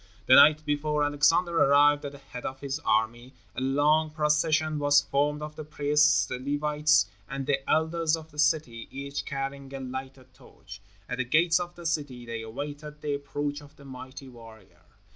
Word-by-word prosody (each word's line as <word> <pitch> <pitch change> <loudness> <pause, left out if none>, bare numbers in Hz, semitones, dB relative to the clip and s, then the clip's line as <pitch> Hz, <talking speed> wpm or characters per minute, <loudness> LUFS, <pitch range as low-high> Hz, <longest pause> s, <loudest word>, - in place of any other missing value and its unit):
The 130 - +5
night 150 +3 +7
before 150 0 0
Alexander 165 +4 +2
arrived 145 +1 +4
at 140 - -6
the - - -10
head 125 -3 -10
of 135 0 -5
his 140 +1 -3
army, 120 0 -1 0.2
a - - -4
long 150 +4 +2
procession 155 0 +1
was 145 0 +5
formed 150 +2 -1
of 150 0 -7
the 155 - -7
priests, 150 0 +2
the 125 - -5
Levites, 150 -2 +2 0.2
and 135 0 -4
the 135 -1 -1
elders 160 +1 +1
of 160 0 -12
the 150 - -11
city, 150 -7 0
each 140 +1 -6
carrying 135 0 -5
a - - -5
lighted 130 0 -8
torch. 95 +1 -14 0.3
At - - -5
the - - +2
gates 165 +7 +3
of 175 0 -6
the 175 - -12
city 145 -7 -3
they 115 -1 -5
awaited 145 +6 -7
the 145 -1 -2
approach 145 +1 -4
of 145 -1 -16
the 140 - -16
mighty 130 +1 -10
warrior. 110 -8 -15
145 Hz, 180 wpm, -27 LUFS, 130-150 Hz, 0.3 s, night